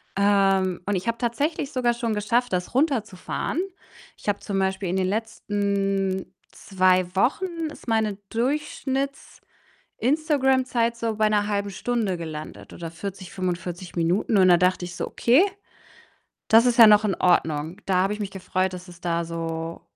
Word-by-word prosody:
Ähm, 195 -2 +2
und 205 0 0
ich 185 +5 -3
habe 230 0 0
tatsächlich 280 +4 -1
sogar 245 -2 +1
schon 235 -2 -2
geschafft, 230 +2 0
das 180 +4 -2
runterzufahren. 260 - -1 0.6
Ich - - -16
habe 205 0 0
zum 195 -1 -3
Beispiel 190 -1 -1
in 185 - 0
den 185 -1 +1
letzten 200 -3 -1 0.2
2 185 -1 +2
Wochen 250 - +2 0.3
ist - - -14
meine 220 -3 +1
Durchschnitts-Instagram-Zeit 275 +2 -3 1.3
so 230 -2 -2
bei 215 0 +3
'ner 210 -1 +1
1/2 200 -1 -1
Stunde 215 -2 -1
gelandet 155 -2 -8
oder 170 -1 -7
40, 185 +2 -7
45 180 -1 -4
Minuten 180 +5 +1
und 185 - +6
da 175 - +7
dachte 180 +1 +1
ich 175 - -9
so: - - -3
„Okay, 260 +11 +4 1.0
das 225 +2 +6
ist 245 0 +2
ja 225 - +11
noch 210 0 +6
in 205 -3 0
Ordnung.“ 160 -1 +1
Da 190 - +1
habe 195 +2 0
ich 210 - -7
mich 200 -2 -4
gefreut, 185 0 -1
dass 180 0 -8
es 175 -1 -14
da 170 -1 -1
so 165 0 -5
195 Hz, 160 wpm, -24 LUFS, 180-225 Hz, 1.3 s, ja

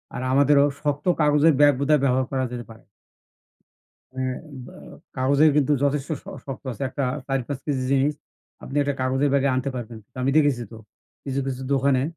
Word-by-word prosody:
আর 125 - -4
আমাদেরও 140 +1 +5 0.2
শক্ত 145 +1 -2
কাগজের 150 +1 +4
ব্যাগ 145 0 +6
বোধহয় 145 +1 +3
ব্যবহার 130 -1 +2
করা 130 -1 0
যেতে 120 -1 -6
পারে। 110 - -15 1.3
হ্যাঁ 130 -1 -2 0.3
বা - - -13 0.4
কাগজের 140 +4 +4
কিন্তু 150 0 +3
যথেষ্ট 140 -1 0
শ - - -36 0.2
শক্ত 135 +1 -7
আছে। 120 - -8
একটা 140 +2 -4 0.2
৪ 135 -1 0
৫ 140 -3 -3
কেজি 140 -4 -1
জিনিস 140 +2 +2 0.5
আপনি 135 - -7
একটা 145 0 -1
কাগজের 130 +2 +1
ব্যাগে 140 0 +2
আনতে 130 +2 -1
পারবেন। 115 -2 -6 0.2
আমি 135 - +2
দেখেছি 145 -6 +3
তো - - -9 0.5
কিছু, 135 -1 -3
কিছু 130 -1 -4
দোকানে 135 -1 +2
140 Hz, 175 wpm, -23 LUFS, 130-145 Hz, 1.3 s, ব্যাগ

